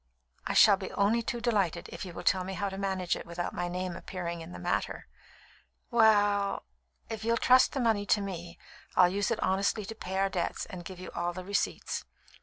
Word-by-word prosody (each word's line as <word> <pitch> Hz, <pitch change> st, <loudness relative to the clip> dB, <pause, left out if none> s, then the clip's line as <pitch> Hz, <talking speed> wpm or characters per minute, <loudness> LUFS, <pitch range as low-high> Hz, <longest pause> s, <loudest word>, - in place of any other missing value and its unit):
"I -, -, -2 dB
shall 205 Hz, -3 st, +8 dB
be 190 Hz, -1 st, -6 dB
only 215 Hz, +4 st, +2 dB
too 235 Hz, +1 st, -3 dB
delighted, 210 Hz, -8 st, 0 dB
if -, -, -6 dB
you 180 Hz, -, -8 dB
will -, -, -7 dB
tell 185 Hz, -1 st, +3 dB
me 190 Hz, +1 st, -5 dB
how 200 Hz, +2 st, -1 dB
to 190 Hz, -, -7 dB
manage 190 Hz, -2 st, 0 dB
it -, -, -8 dB
without 170 Hz, +1 st, -4 dB
my 175 Hz, -, -2 dB
name 180 Hz, 0 st, -3 dB
appearing 170 Hz, -2 st, -5 dB
in 165 Hz, +2 st, -9 dB
the -, -, -7 dB
matter." 175 Hz, 0 st, -2 dB, 0.9 s
"We 235 Hz, -, 0 dB
ll, 205 Hz, -2 st, +3 dB, 0.4 s
if 220 Hz, -1 st, -5 dB
you'd 230 Hz, 0 st, +1 dB
trust 255 Hz, 0 st, +5 dB
the 275 Hz, -, -1 dB
money 220 Hz, -4 st, +1 dB
to 210 Hz, -, +4 dB
me, 175 Hz, -4 st, -6 dB, 0.4 s
I'd 180 Hz, 0 st, +5 dB
use 200 Hz, 0 st, 0 dB
it 230 Hz, -, 0 dB
honestly 195 Hz, +2 st, +1 dB
to 225 Hz, -, -6 dB
pay 190 Hz, -3 st, -5 dB
our 195 Hz, 0 st, +3 dB
debts, 180 Hz, -3 st, -2 dB
and 180 Hz, -2 st, -8 dB
give 185 Hz, 0 st, -9 dB
you 185 Hz, -, -8 dB
all 175 Hz, 0 st, -2 dB
the 185 Hz, +1 st, -6 dB
receipts." 200 Hz, +1 st, -1 dB
195 Hz, 215 wpm, -30 LUFS, 180-210 Hz, 0.9 s, shall